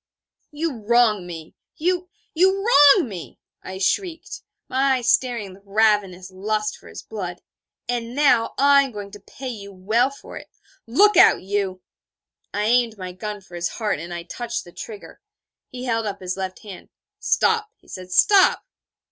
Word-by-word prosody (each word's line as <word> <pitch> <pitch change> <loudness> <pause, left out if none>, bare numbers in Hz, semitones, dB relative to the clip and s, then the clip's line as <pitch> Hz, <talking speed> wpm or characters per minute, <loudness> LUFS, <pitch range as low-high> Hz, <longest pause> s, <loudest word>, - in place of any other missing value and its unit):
'You 300 -3 -3
wrong 215 -4 +3
me 165 -2 -9 0.2
you, 360 +2 -1 0.2
you 380 +4 +2
wrong 290 - +6
me!' 185 -6 -9 0.2
I 190 - -8
shrieked, 330 - -2 0.3
my 265 0 +2
eyes 245 -1 +1
staring 235 -8 0
with 195 - -17
ravenous 200 -3 +1
lust 210 +3 -2
for - - -17
his - - -10
blood; 180 -5 -7 0.4
'and 240 0 -3
now 270 -6 +3
I 280 0 +6
am 270 -2 -3
going 205 -1 -7
to 205 - -11
pay 260 +6 -9
you 200 -4 -8
well 215 +7 +1
for 275 - -11
it. - - -11 0.4
Look 400 - +4
out, - - +6
you!' 190 -2 -2 0.7
I 205 - -2
aimed 230 0 +2
my 185 -1 -6
gun 210 +3 -6
for 185 - -20
his 175 0 -2
heart, 215 -9 -2
and 170 +2 -8
I 170 -1 -5
touched 235 +6 -5
the 175 - -14
trigger. 210 +3 -10 0.5
He 250 0 -8
held 225 -2 -1
up 200 -1 -5
his 185 -1 -4
left 190 -1 -6
hand. 200 -4 -11 0.3
'Stop,' 445 -1 +1
he - - -29
said, 185 -1 -9
'stop.' 390 - +4
215 Hz, 170 wpm, -22 LUFS, 190-265 Hz, 0.7 s, wrong